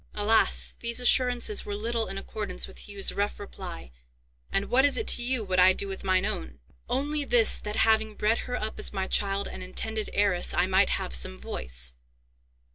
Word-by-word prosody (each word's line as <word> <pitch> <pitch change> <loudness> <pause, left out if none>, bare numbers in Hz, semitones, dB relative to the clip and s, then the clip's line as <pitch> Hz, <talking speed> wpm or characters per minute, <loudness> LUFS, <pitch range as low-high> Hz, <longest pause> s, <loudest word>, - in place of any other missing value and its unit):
Alas! 215 +2 +3
these 235 +1 +2
assurances 250 - +2
were 205 - -5
little 225 +2 -2
in 195 - -6
accordance 195 -2 -5
with - - -12
Hugh's 200 -1 -1
rough 205 +1 -2
reply, 180 - -9 0.6
"And 195 - 0
what 260 +2 +3
is 285 -1 +3
it 445 - -1
to - - +4
you 245 -1 +2
what 185 -2 -1
I 185 +1 +6
do 200 - -1
with 195 -1 -7
mine 185 0 +1
own?" 65 - -5 0.3
"Only 290 +2 -1
this, 240 -5 +3
that, 210 0 -6
having 220 -1 +2
bred 215 +3 0
her 245 - -2
up 215 - -5
as - - +2
my 190 -2 -3
child 200 0 0
and - - -9
intended 215 +4 -2
heiress, 200 -3 +1
I - - +2
might 190 +1 +3
have - - -2
some 60 0 0
voice." - - -2
205 Hz, 195 wpm, -26 LUFS, 185-230 Hz, 0.6 s, I